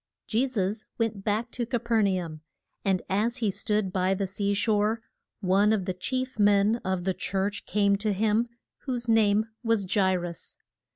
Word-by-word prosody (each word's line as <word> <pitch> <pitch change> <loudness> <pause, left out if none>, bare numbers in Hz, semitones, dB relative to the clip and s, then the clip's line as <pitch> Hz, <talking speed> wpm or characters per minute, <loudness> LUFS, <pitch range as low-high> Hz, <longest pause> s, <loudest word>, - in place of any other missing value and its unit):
JE 240 +4 +1
SUS 215 -3 -2
went 220 -4 -1
back 220 +3 -1
to 245 - -2
Ca 240 +1 -1
per 230 -1 +1
na 190 -3 +1
um. 155 -2 -9 0.4
And 190 -2 +1
as 220 +6 0
he 220 -5 0
stood 210 -1 -1
by 185 +1 +2
the 195 +1 -1
sea 200 +1 -1
shore, 215 +1 +1 0.4
one 200 +2 +3
of 205 -4 +1
the 185 - -1
chief 255 +6 -3
men 205 +2 +4
of 190 -1 -1
the 190 +1 0
church 195 +2 -2
came 200 -1 +3
to 210 +1 -1
him, 215 +3 +2 0.4
whose 245 -2 -2
name 215 -1 +4 0.2
was 215 -4 0
Ja 195 -2 +4
i 190 - +3
rus. 175 -1 -6
205 Hz, 185 wpm, -27 LUFS, 190-225 Hz, 0.4 s, men